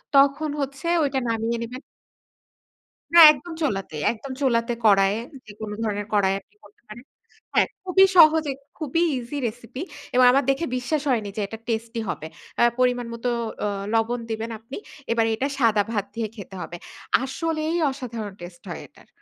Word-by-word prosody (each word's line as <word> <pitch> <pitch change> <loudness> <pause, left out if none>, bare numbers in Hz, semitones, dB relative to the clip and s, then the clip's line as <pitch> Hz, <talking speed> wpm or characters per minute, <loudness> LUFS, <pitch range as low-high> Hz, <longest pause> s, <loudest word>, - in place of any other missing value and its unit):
তখন 280 +2 +4
হচ্ছে 275 +3 -4 0.2
ওইটা 275 -1 0
নামিয়ে 230 +1 -1
নিবেন 250 +3 -7 1.3
না 340 - +8
একদম 305 +4 -7
চুলাতে, 195 - -2 0.2
একদম 240 +4 -8
চুলাতে 240 -3 +2
কড়াইয়ে 195 0 +5 0.3
যেকোন 215 0 -8
ধরনের 205 -2 -2
কড়াইয়ে 195 -2 +3
আপনি - - -36
করতে 415 - -20
পারেন 235 +4 -11 0.5
হ্যাঁ, - - +4 0.2
খুবই 380 +1 +5
সহজে 315 -2 +7 0.3
খুবই 310 +1 -1 0.2
ইজি 250 +4 -5
রেসিপি 240 +4 -8 0.3
এবং 255 0 +6
আমার 275 +2 +3
দেখে 275 +5 +1
বিশ্বাস 275 +4 -1
হয়নি 220 -5 0
যে - - 0
এটা 225 - -7
টেস্টি 230 0 -2
হবে। 155 - -4 0.3
আ - - +4 0.2
পরিমাণ 245 -1 +2
মত 230 +1 -9 0.4
অ - - +1 0.3
লবণ 230 +2 +1
দিবেন 225 +1 -3
আপনি। 230 +5 -9 0.3
এবার 230 -1 +3
এটা 265 +5 -1
সাদা 220 -4 +4
ভাত 205 -3 -1
দিয়ে 230 -1 -1
খেতে 200 -3 -9
হবে। 175 - -6 0.5
আসলেই 315 +3 -2 0.2
অসাধারণ 230 -6 -6
টেস্ট 175 0 -10
হয় - - -5
এটার। - - -21
235 Hz, 160 wpm, -24 LUFS, 220-275 Hz, 1.3 s, না